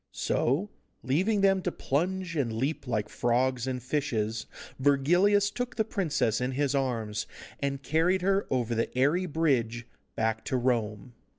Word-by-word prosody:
So, 160 Hz, -, 0 dB, 0.3 s
leaving 190 Hz, +11 st, +1 dB
them 195 Hz, -1 st, +4 dB
to 180 Hz, -, -1 dB
plunge 175 Hz, +5 st, -2 dB
and 135 Hz, -7 st, 0 dB
leap 135 Hz, +5 st, -2 dB
like 110 Hz, -4 st, -1 dB
frogs 125 Hz, +1 st, 0 dB
and 125 Hz, -2 st, -3 dB
fishes, 115 Hz, -6 st, -1 dB, 0.3 s
Virgilius 175 Hz, +10 st, +3 dB
took 245 Hz, +3 st, -4 dB
the 220 Hz, -, +1 dB
princess 150 Hz, -, 0 dB
in 125 Hz, +1 st, -1 dB
his 140 Hz, 0 st, 0 dB
arms, 115 Hz, -6 st, -1 dB, 0.3 s
and 140 Hz, -1 st, -2 dB
carried 175 Hz, +5 st, +2 dB
her 195 Hz, +1 st, +2 dB
over 120 Hz, -3 st, 0 dB
the 115 Hz, 0 st, 0 dB
airy 160 Hz, +8 st, +2 dB
bridge 125 Hz, -8 st, 0 dB, 0.3 s
back 110 Hz, 0 st, 0 dB
to 130 Hz, -, 0 dB
Rome. 120 Hz, -2 st, -1 dB
135 Hz, 150 wpm, -28 LUFS, 120-180 Hz, 0.3 s, them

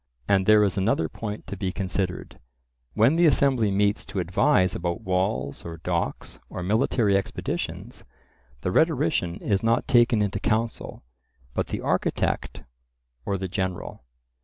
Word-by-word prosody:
And 95 Hz, -1 st, +2 dB
there 105 Hz, -1 st, +7 dB
is 100 Hz, -1 st, 0 dB
another 95 Hz, -5 st, +1 dB
point 105 Hz, +4 st, -6 dB
to -, -, -6 dB
be 95 Hz, -1 st, -2 dB
considered:—when 90 Hz, -, -2 dB
the 170 Hz, -1 st, +5 dB
assembly 130 Hz, -6 st, +3 dB
meets 100 Hz, +1 st, +1 dB
to 95 Hz, +1 st, -7 dB
advise 90 Hz, -, +2 dB
about 85 Hz, 0 st, -3 dB
walls 90 Hz, -8 st, -1 dB
or 85 Hz, 0 st, -7 dB
docks 85 Hz, +1 st, -3 dB
or 90 Hz, -, -5 dB
military 105 Hz, +1 st, +2 dB
expeditions, 100 Hz, -, -4 dB, 0.6 s
the 90 Hz, -, -1 dB
rhetorician 90 Hz, -, +1 dB
is 95 Hz, +1 st, -1 dB
not 115 Hz, +1 st, +1 dB
taken 120 Hz, -3 st, +4 dB
into 100 Hz, 0 st, -2 dB
counsel, 110 Hz, -, -2 dB, 0.5 s
but -, -, -1 dB
the -, -, -4 dB
architect, -, -, -1 dB, 0.6 s
or 100 Hz, -, 0 dB
the 95 Hz, 0 st, -4 dB
general. 95 Hz, -, -4 dB
95 Hz, 135 wpm, -25 LUFS, 90-110 Hz, 0.6 s, there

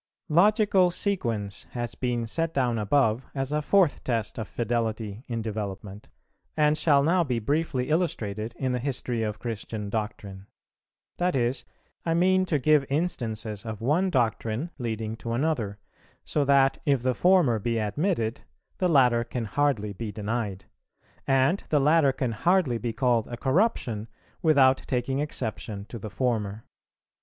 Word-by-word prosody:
Logical 195 Hz, +2 st, +4 dB
Sequence 115 Hz, -, -2 dB
has 120 Hz, -1 st, -3 dB
been 120 Hz, -2 st, -2 dB
set 165 Hz, +8 st, -2 dB
down 125 Hz, -4 st, +1 dB
above 115 Hz, +2 st, +1 dB
as 135 Hz, 0 st, -2 dB
a 150 Hz, 0 st, +1 dB
fourth 180 Hz, 0 st, +2 dB
test 115 Hz, -2 st, -2 dB
of 110 Hz, -, -4 dB
fidelity 115 Hz, -2 st, -2 dB
in 115 Hz, -2 st, -3 dB
development, 105 Hz, -2 st, -6 dB, 0.5 s
and 150 Hz, 0 st, +4 dB
shall 145 Hz, -3 st, +3 dB
now 175 Hz, +4 st, +3 dB
be 125 Hz, -6 st, -1 dB
briefly 135 Hz, +2 st, -1 dB
illustrated 115 Hz, -, -1 dB
in 130 Hz, -2 st, -1 dB
the 125 Hz, -, -1 dB
history 125 Hz, -3 st, -2 dB
of 105 Hz, -1 st, -2 dB
Christian 110 Hz, -2 st, -5 dB
doctrine. 100 Hz, -3 st, -5 dB, 0.7 s
That 180 Hz, -2 st, +1 dB
is, 125 Hz, 0 st, 0 dB, 0.4 s
I 165 Hz, -1 st, 0 dB
mean 185 Hz, +2 st, +3 dB
to 155 Hz, -, +2 dB
give 150 Hz, +1 st, +4 dB
instances 115 Hz, -, -2 dB
of 110 Hz, -3 st, -6 dB
one 155 Hz, +11 st, +1 dB
doctrine 120 Hz, -, -1 dB
leading 110 Hz, -2 st, -3 dB
to 115 Hz, 0 st, -4 dB
another; 120 Hz, -7 st, -1 dB, 0.5 s
so 150 Hz, -, 0 dB
that, 135 Hz, -1 st, +4 dB
if 140 Hz, -4 st, +1 dB
the 130 Hz, 0 st, +2 dB
former 170 Hz, -, +3 dB
be 115 Hz, +2 st, -1 dB
admitted, 115 Hz, -, -1 dB, 0.4 s
the 185 Hz, -, +2 dB
latter 125 Hz, -6 st, +4 dB
can 120 Hz, -1 st, -4 dB
hardly 110 Hz, -4 st, 0 dB
be 105 Hz, +2 st, -5 dB
denied, 105 Hz, -1 st, -3 dB, 0.6 s
and 135 Hz, +8 st, +3 dB
the 150 Hz, -, +3 dB
latter 150 Hz, 0 st, +4 dB
can 130 Hz, -2 st, -2 dB
hardly 145 Hz, -, +2 dB
be 120 Hz, 0 st, -2 dB
called 120 Hz, -1 st, +1 dB
a 120 Hz, -, -6 dB
corruption 130 Hz, -, 0 dB, 0.3 s
without 135 Hz, -5 st, +5 dB
taking 130 Hz, +2 st, -1 dB
exception 110 Hz, -8 st, -4 dB
to 115 Hz, -, -7 dB
the 110 Hz, -, -6 dB
former. 110 Hz, -3 st, -2 dB
125 Hz, 150 wpm, -26 LUFS, 110-150 Hz, 0.7 s, without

